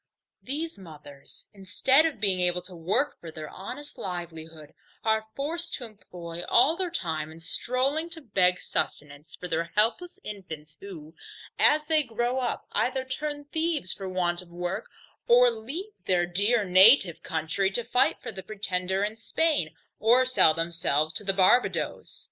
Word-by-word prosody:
These 300 Hz, -1 st, -4 dB
mothers, 150 Hz, -5 st, -13 dB
instead 210 Hz, +10 st, +3 dB
of 315 Hz, -, -6 dB
being 195 Hz, -4 st, +2 dB
able 180 Hz, 0 st, +1 dB
to 180 Hz, 0 st, -11 dB
work 185 Hz, -, 0 dB
for 170 Hz, -, -9 dB
their 155 Hz, -1 st, -8 dB
honest 290 Hz, +9 st, -8 dB
livelihood, 165 Hz, -4 st, -7 dB, 0.3 s
are 220 Hz, 0 st, +1 dB
forced 330 Hz, +5 st, -3 dB
to 250 Hz, -, -7 dB
employ 175 Hz, -6 st, -9 dB
all 265 Hz, +7 st, +5 dB
their 365 Hz, 0 st, -2 dB
time 160 Hz, -, -3 dB
in 160 Hz, -, -12 dB
stroling 260 Hz, -, -1 dB
to 325 Hz, -1 st, -10 dB
beg 185 Hz, -7 st, +2 dB
sustenance 145 Hz, +1 st, -4 dB
for 180 Hz, -, -7 dB
their 165 Hz, 0 st, -1 dB
helpless 240 Hz, -, +1 dB
infants 160 Hz, -7 st, -8 dB
who, 165 Hz, -6 st, -10 dB, 0.5 s
as 305 Hz, 0 st, +5 dB
they 310 Hz, 0 st, +3 dB
grow 240 Hz, 0 st, -1 dB
up, 245 Hz, -2 st, -2 dB
either 260 Hz, +1 st, 0 dB
turn 290 Hz, +2 st, -4 dB
thieves 315 Hz, -, -1 dB
for 195 Hz, -1 st, -6 dB
want 175 Hz, -1 st, -1 dB
of 180 Hz, -, -16 dB
work, 175 Hz, +1 st, -4 dB, 0.4 s
or 245 Hz, +1 st, +6 dB
leave 285 Hz, -, -7 dB
their 175 Hz, -2 st, +3 dB
dear 205 Hz, +6 st, +1 dB
native 190 Hz, -, +6 dB
country, 160 Hz, +5 st, -1 dB
to 215 Hz, +5 st, -1 dB
fight 250 Hz, +2 st, +2 dB
for -, -, -5 dB
the 195 Hz, -3 st, -8 dB
Pretender 190 Hz, -1 st, -2 dB
in 210 Hz, +2 st, -3 dB
Spain, 230 Hz, -, 0 dB, 0.2 s
or 240 Hz, +4 st, +5 dB
sell 255 Hz, -11 st, +4 dB
themselves 165 Hz, -2 st, 0 dB
to -, -, -4 dB
the 195 Hz, -, +3 dB
Barbadoes. 195 Hz, +6 st, +1 dB
195 Hz, 160 wpm, -27 LUFS, 175-255 Hz, 0.5 s, or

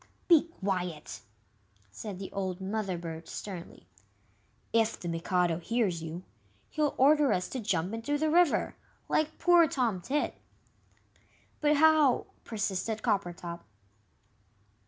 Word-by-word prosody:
"Be 335 Hz, -2 st, +6 dB
quiet!" 180 Hz, -5 st, -3 dB, 0.7 s
said 195 Hz, -, -7 dB
the 190 Hz, 0 st, -7 dB
old 190 Hz, -2 st, -3 dB
Mother 195 Hz, -1 st, -2 dB
bird, 165 Hz, -1 st, -7 dB
sternly; 180 Hz, -, -8 dB, 0.9 s
"if 225 Hz, -1 st, +2 dB
the 175 Hz, -, -6 dB
Mikado 170 Hz, 0 st, 0 dB
hears 200 Hz, -3 st, 0 dB
you, 165 Hz, +3 st, -6 dB, 0.5 s
he'll 300 Hz, -2 st, 0 dB
order 290 Hz, 0 st, +5 dB
us 180 Hz, -2 st, 0 dB
to 260 Hz, -, -4 dB
jump 190 Hz, -4 st, -1 dB
into 230 Hz, +6 st, -1 dB
the 310 Hz, +1 st, +1 dB
river 345 Hz, -2 st, +3 dB, 0.3 s
like 310 Hz, 0 st, 0 dB
poor 345 Hz, -2 st, +5 dB
Tom 240 Hz, -10 st, 0 dB
Tit." 285 Hz, +11 st, -2 dB, 1.2 s
"But 300 Hz, 0 st, +3 dB
how 310 Hz, -4 st, +5 dB
" -, -, -37 dB
persisted 215 Hz, 0 st, -2 dB
Coppertop. 175 Hz, -3 st, -2 dB
205 Hz, 120 wpm, -30 LUFS, 180-285 Hz, 1.2 s, Be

